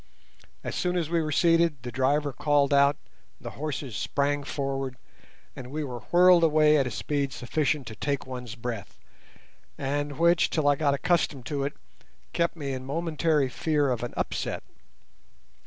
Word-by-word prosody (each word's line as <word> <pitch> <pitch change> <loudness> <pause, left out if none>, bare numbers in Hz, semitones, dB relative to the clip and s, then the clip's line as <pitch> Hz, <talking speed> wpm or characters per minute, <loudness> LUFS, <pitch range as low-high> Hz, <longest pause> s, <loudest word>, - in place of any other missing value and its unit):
As - - -4
soon 180 0 0
as 165 -2 -2
we 170 -1 +2
were 155 -1 -2
seated 165 -4 +3
the 125 - -5
driver 140 +3 +1
called 145 0 +2
out, 140 +1 +4 0.4
the - - -7
horses 145 -5 -5
sprang 145 +4 0
forward, 135 -2 -3 0.6
and 125 -2 -8
we 150 +3 -3
were 125 -4 -5
whirled 180 0 +6
away 155 -1 +5
at 135 -3 +2
a - - -2
speed 140 +5 -2
sufficient 145 +3 -1
to 110 -1 -8
take 140 +4 -2
one's 125 -3 -7
breath, 115 -3 -6 0.8
and 145 +1 -2
which, 170 +1 +4
till 155 -3 0
I 145 - +5
got 140 -1 +1
accustomed 145 -5 0
to 140 -2 -2
it, 145 - -3 0.6
kept 170 0 0
me 140 -4 -4
in 130 0 -5
momentary 155 0 0
fear 145 +1 0
of 120 - -1
an 120 - -5
upset. - - -2
145 Hz, 165 wpm, -27 LUFS, 135-155 Hz, 0.8 s, whirled